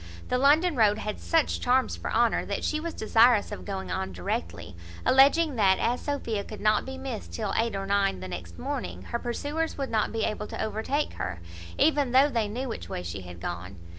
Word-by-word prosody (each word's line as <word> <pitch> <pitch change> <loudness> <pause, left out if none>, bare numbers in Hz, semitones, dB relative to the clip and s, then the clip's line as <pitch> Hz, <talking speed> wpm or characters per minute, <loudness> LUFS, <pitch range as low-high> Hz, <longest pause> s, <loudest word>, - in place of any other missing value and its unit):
The 250 - +1
London 305 +5 +4
road 215 -3 +4
had 210 -1 -4
such 325 -2 +1
charms 255 +1 +2
for - - -5
Honour, - - +2
that - - -3
she 305 - 0
was 335 +1 -5
desirous 225 0 +4
of - - -7
going 195 -2 -4
on 95 0 -2
directly; 85 -1 -4 0.3
alleging 280 +2 +5
that, 190 -3 +4
as 245 +2 0
Sophia 235 -8 -2
could 215 - -9
not 215 +3 +2
be 265 0 -6
missed 265 -4 -6
till 215 -3 -2
eight 230 -2 +1
or 195 0 -3
nine 200 - +1
the 95 - -6
next 90 -1 -7
morning, 90 +2 -4
her 235 - -3
pursuers 290 +7 -3
would 275 -2 -3
not 220 -1 +1
be 225 -1 -1
able 210 0 -2
to - - -7
overtake 220 +7 -1
her, 95 -2 -4 0.4
even 285 -5 +3
though 270 +3 +6
they 230 -5 0
knew 245 +6 -4
which 85 - -6
way 90 - -4
she 85 +2 -5
had 90 -1 -10
gone. 90 +2 -5
220 Hz, 210 wpm, -27 LUFS, -, 0.4 s, though